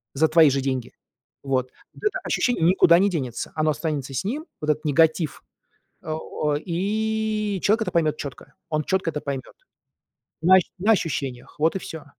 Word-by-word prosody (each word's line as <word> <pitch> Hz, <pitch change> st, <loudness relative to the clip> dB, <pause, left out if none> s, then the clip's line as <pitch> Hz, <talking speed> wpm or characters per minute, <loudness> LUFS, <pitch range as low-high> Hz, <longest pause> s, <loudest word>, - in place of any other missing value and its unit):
за 160 Hz, +3 st, +4 dB
твои 160 Hz, -2 st, +6 dB
же 135 Hz, 0 st, 0 dB
деньги. 130 Hz, -2 st, -3 dB, 0.5 s
Вот 130 Hz, -2 st, -1 dB, 0.2 s
вот -, -, -16 dB
это 420 Hz, -, +1 dB
ощущение 245 Hz, -10 st, 0 dB
никуда 170 Hz, -1 st, +6 dB
не 200 Hz, +1 st, +3 dB
денется. 130 Hz, -9 st, -4 dB
Оно 155 Hz, 0 st, +1 dB
останется 145 Hz, -4 st, -3 dB
с -, -, -1 dB
ним, 285 Hz, -, -3 dB, 0.2 s
вот 150 Hz, -, -3 dB
этот 155 Hz, +1 st, -4 dB
негатив. 160 Hz, +1 st, +2 dB, 0.6 s
Э, -, -, -12 dB
о 150 Hz, -1 st, -2 dB
и 215 Hz, +3 st, -1 dB
человек 220 Hz, +2 st, +3 dB
это -, -, -3 dB
поймёт 155 Hz, -3 st, +2 dB
чётко, 135 Hz, -1 st, -8 dB, 0.2 s
он 155 Hz, -2 st, -1 dB
чётко 185 Hz, -3 st, 0 dB
это 150 Hz, -1 st, -4 dB
поймёт. 140 Hz, -2 st, -5 dB, 0.9 s
На 185 Hz, +3 st, +7 dB
ощу 185 Hz, -, +2 dB
на 205 Hz, +5 st, +2 dB
ощущениях, 135 Hz, -, -3 dB
вот 160 Hz, +4 st, +2 dB
и -, -, -1 dB
всё. 160 Hz, -4 st, -8 dB
160 Hz, 175 wpm, -24 LUFS, 145-190 Hz, 0.9 s, На